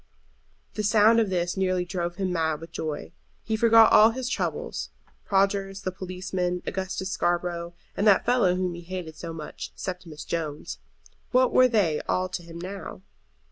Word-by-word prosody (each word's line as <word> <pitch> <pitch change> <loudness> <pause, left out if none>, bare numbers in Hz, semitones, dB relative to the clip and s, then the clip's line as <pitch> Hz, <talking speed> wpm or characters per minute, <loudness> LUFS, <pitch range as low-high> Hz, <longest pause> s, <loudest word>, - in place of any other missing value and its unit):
The - - -2
sound 215 +2 +5
of 220 -3 +1
this 175 -1 -1
nearly 185 -2 0
drove 175 -1 -3
him 185 -1 -2
mad 160 -3 0
with 165 - -10
joy. 150 - -4 0.3
He 220 - -1
forgot 225 0 +6
all 215 +1 +8
his 250 +2 -3
troubles. - - -3 0.4
Prodgers, 195 0 +1
the 185 - -1
policeman, 185 -1 -3
Augustus 190 0 -3
Scarborough, 175 -1 -1 0.2
and 205 - +1
that 200 -2 +5
fellow 235 -8 +3
whom 180 -1 -1
he 170 - -8
hated 175 -2 -6
so 165 0 -7
much, 155 -2 -7
Septimus 180 -5 -6
Jones; 155 -3 -4 0.5
what 255 0 +3
were 255 - +7
they 200 -11 +1
all 185 0 +1
to 180 - -4
him 170 -1 -10
now? 185 +1 -7
185 Hz, 165 wpm, -26 LUFS, 170-200 Hz, 0.5 s, all